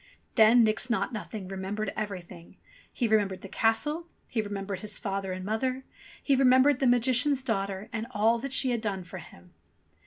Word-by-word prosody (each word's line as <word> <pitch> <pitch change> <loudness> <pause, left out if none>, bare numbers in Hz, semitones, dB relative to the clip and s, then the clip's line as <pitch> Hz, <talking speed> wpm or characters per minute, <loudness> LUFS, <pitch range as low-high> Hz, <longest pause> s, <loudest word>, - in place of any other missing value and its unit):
Then 230 +1 +6
Nix 220 +3 +1
Naught 235 +1 0
Nothing 210 -2 -6
remembered 195 +2 -4
everything. 185 -5 -7 0.3
He 240 - -1
remembered 205 -4 +1
the - - -8
castle, 285 - 0 0.2
he 225 - -1
remembered 200 -2 -5
his 210 +1 -3
father 195 -3 -3
and 185 0 -5
mother, 255 +5 -1 0.4
he 280 - +3
remembered 260 +1 +5
the 270 - +2
Magician's 255 +3 +2
daughter 195 -4 -2
and 225 0 -3
all 230 0 +2
that 275 +2 -5
she 260 -1 +2
had 235 -2 -1
done 200 -4 -3
for 180 +2 -9
him. 90 - -15
220 Hz, 175 wpm, -28 LUFS, 195-250 Hz, 0.4 s, Then